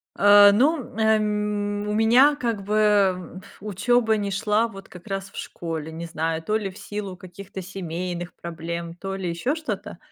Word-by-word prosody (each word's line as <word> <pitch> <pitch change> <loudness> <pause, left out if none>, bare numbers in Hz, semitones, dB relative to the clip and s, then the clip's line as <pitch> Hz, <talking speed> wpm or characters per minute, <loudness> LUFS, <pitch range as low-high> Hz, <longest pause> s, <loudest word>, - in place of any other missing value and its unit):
А, 205 0 +8
ну, 275 +10 +3
м, 235 - -10
а, 220 0 +4
м, 210 -1 -1
у - - -1
меня 245 +7 +5
как 230 -7 -2
бы 200 -3 +2
пф - - -17
учеба 220 +3 +2
не 200 -1 -2
шла 210 +3 +1
вот 195 -3 -11
как 180 +3 -13
раз 195 -1 -4
в - - -13
школе, 160 -2 -5
не 165 +1 -6
знаю, 160 0 -2
то 215 - 0
ли 205 -3 -3
в 185 - -13
силу 205 -4 -6
каких-то 190 +1 -9
семейных 175 -1 -5
проблем, 170 0 -6
то 195 +2 -5
ли 185 -3 -3
ещё 245 - -1
что-то. 315 -2 -5
200 Hz, 185 wpm, -24 LUFS, 180-215 Hz, -, А